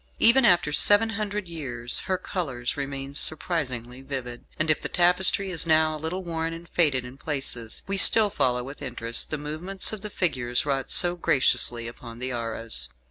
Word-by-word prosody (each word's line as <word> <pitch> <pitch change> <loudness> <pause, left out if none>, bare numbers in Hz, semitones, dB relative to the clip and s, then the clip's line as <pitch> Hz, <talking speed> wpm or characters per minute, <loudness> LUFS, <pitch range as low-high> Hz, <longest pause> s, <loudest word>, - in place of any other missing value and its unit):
Even 240 +2 +5
after 175 -7 +3
seven 205 +9 +6
hundred 210 -2 -4
years 125 -8 -2
her 185 - -1
colours 135 -12 -4
remain 140 -1 -6
surprisingly 130 -6 -2
vivid, 130 -3 -8
and 155 0 +1
if 155 - -1
the - - -6
tapestry 185 +2 +1
is 165 -1 -2
now 155 -1 +2
a - - -8
little 180 +4 -5
worn 165 -1 -4
and 165 +1 -11
faded 140 -7 0
in 125 +2 -12
places, 135 -7 -3
we 195 0 -3
still 210 +2 +7
follow 125 -10 +1
with 140 +3 -11
interest 115 -3 +1
the 155 - -3
movements 160 +8 -2
of 215 - -6
the 210 - -6
figures 125 -12 -1
wrought 135 -2 -2
so 175 0 +4
graciously 120 -7 +2
upon 120 -1 -11
the 130 +1 -4
arras. 115 - -3
150 Hz, 180 wpm, -24 LUFS, 125-180 Hz, -, still